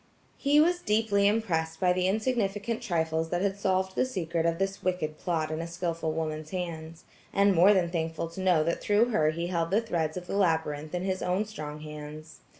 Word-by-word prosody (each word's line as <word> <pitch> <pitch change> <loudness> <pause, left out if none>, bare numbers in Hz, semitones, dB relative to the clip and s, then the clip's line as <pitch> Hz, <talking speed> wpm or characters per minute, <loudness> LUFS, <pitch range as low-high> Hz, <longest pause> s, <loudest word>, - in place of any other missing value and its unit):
He 290 +1 +4
was 350 +3 +4
deeply 210 -4 +2
impressed 165 -7 0
by 180 -1 +3
the 180 0 +1
insignificant 220 +1 -1
trifles 160 -6 -1
that 175 +2 -1
had 195 -1 +1
solved 190 -1 0
the - - +3
secret 170 -9 -1
of 165 0 0
this 195 +1 -2
wicked 180 -4 -2
plot, 160 -3 -1
in 155 +1 -2
a 165 - -4
skillful 170 -2 -2
woman's 155 -1 -3
hands, 165 -2 -5 0.3
and 200 0 +4
more 185 +3 +6
than 180 -4 +2
thankful 165 -1 -2
to 170 +3 -7
know 180 -4 +4
that 170 +2 -1
through 210 +4 +3
her 155 -9 +3
he 170 +2 -2
held 170 -2 -1
the 200 +4 +3
threads 170 -8 -2
of 180 - -6
the 185 - -4
labyrinth 160 -4 0
in 180 - -2
his 190 -1 -1
own 185 +4 0
strong 150 -8 -7
hands. 150 +1 -9
175 Hz, 205 wpm, -28 LUFS, 160-200 Hz, 0.3 s, more